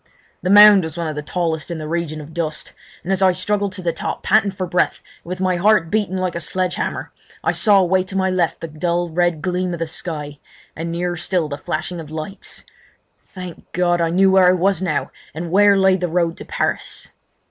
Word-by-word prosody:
The 180 - -2
mound 205 -1 +8
was 160 0 -6
one 170 -1 -2
of 155 - -3
the 150 - -4
tallest 160 0 -2
in 170 - -4
the 155 -1 -6
region 160 -2 -3
of 150 +2 -12
dust, 155 -2 -4 0.3
and 190 +3 -1
as 190 - -1
I 190 -1 +5
struggled 205 +1 -1
to 185 -1 -7
the 170 -1 0
top, - - -4
panting 205 0 +3
for 185 -1 -4
breath 180 0 0 0.2
and - - -39
with 180 0 -4
my 185 -1 +1
heart 190 -3 +3
beating 205 -3 0
like 185 -2 -1
a 170 - -3
sledge 180 +2 -1
hammer, - - -4 0.3
I - - +2
saw 205 -3 +4
away 185 +1 +2
to 190 - -8
my 190 0 +1
left 180 -3 0
the 165 - -4
dull 170 +3 -1
red 170 -1 0
gleam 180 -1 -1
of 170 - -5
the 165 - -1
sky, 155 -3 -5 0.4
and 165 +1 -4
nearer 175 +1 -2
still 170 -1 -1
the 145 - -4
flashing 175 +1 -4
of 155 -3 -8
lights. 160 +6 -6 0.6
Thank 180 -3 -10
God! 175 -1 +1
I 165 - +1
knew 190 +3 +4
where 190 -1 +6
I 180 - +6
was 190 +2 +1
now 170 -6 -1 0.2
and 165 +1 -5
where 200 +1 +5
lay 190 -1 +4
the 180 -1 -2
road 170 0 0
to - - -9
Paris! - - -3
175 Hz, 225 wpm, -20 LUFS, 165-190 Hz, 0.6 s, mound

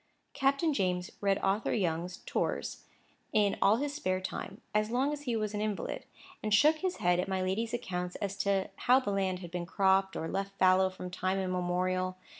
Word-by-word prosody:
Captain 275 +4 +2
James 180 -5 0
read 200 -1 +2
Arthur 195 +3 +1
Young's 180 -2 -2
"Tours" - - -2 0.5
in 205 -2 +3
all 205 - +6
his 285 +4 -2
spare 185 -11 -1
time, 190 +1 -5
as 215 0 +2
long 265 +5 +1
as 295 - -5
he 240 -3 0
was 215 -1 -1
an 210 - -2
invalid; 210 -2 -3 0.4
and 215 - -2
shook 305 +7 +5
his 370 +2 -2
head 175 0 +2
at 180 - -1
my 190 -1 -1
lady's 215 +5 -1
accounts 180 -6 -3
as 200 -1 -3
to 200 -1 0 0.2
how 255 +2 +7
the 230 -6 -2
land 190 -2 0
had 175 -2 -8
been 175 -1 -4
cropped 190 0 +2
or 160 - -3
left 195 +2 -3
fallow 185 0 +5
from 180 -1 -8
time 185 +1 -1
immemorial. 185 0 -1
195 Hz, 195 wpm, -31 LUFS, 185-215 Hz, 0.5 s, how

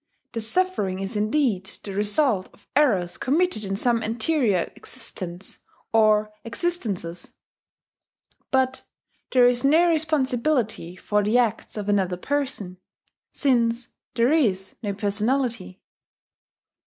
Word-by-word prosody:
The 230 - -3
suffering 220 - 0
is 195 +2 -4
indeed 215 -2 +1 0.2
the 200 - -5
result 205 +1 +1
of 205 - -24
errors 205 -12 +2
committed 305 -3 +1
in 195 -1 -2
some 230 +2 +1
anterior 225 - 0
existence 180 +1 -7 0.3
or 215 -1 +4
existences; 230 - -3 1.1
but 260 -1 +1 0.5
there 250 -1 +6
is 245 +1 +1
no 320 +5 +5
responsibility 265 - 0
for 210 +3 0
the 215 +4 +2
acts 225 -2 0
of 205 -1 -4
another 190 -3 +1
person, 255 -7 -3 0.5
since 240 -3 +1 0.3
there 235 +3 +3
is 205 -12 +1
no 205 -3 -2
personality. 215 0 -1
225 Hz, 110 wpm, -24 LUFS, 200-265 Hz, 1.1 s, there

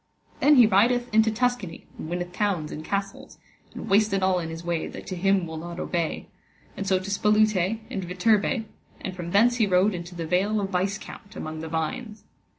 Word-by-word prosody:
Then 295 +1 +6
he 245 -3 +8
rideth 235 +4 +3
into 220 +1 +5
Tuscany, 235 -6 -2
and 155 - -7
winneth 175 0 -4
towns 185 -6 -1
and 155 - -6
castles, 195 +3 -4 0.3
and - - -8
wasted 195 -1 +3
all 185 -1 +3
in 165 -2 -4
his 165 +1 -7
way 170 -1 -2
that - - -9
to 185 - -5
him 195 0 +2
will 160 -1 -6
not 170 +2 -7
obey, 170 -3 -2 0.5
and 195 - -4
so 190 -1 +3
to 185 +2 -5
Spolute 210 -1 +2
and 190 - -3
Viterbe, 210 +6 +1 0.4
and 185 - -5
from 175 -2 -6
thence 235 +6 +4
he 220 -4 +3
rode 190 +2 +3
into 175 0 -7
the 170 -1 -4
Vale 195 +6 +1
of 195 -1 -3
Vicecount 195 +2 -3
among 155 0 -5
the 160 - -5
vines. 165 +8 -4
195 Hz, 195 wpm, -25 LUFS, 175-215 Hz, 0.5 s, he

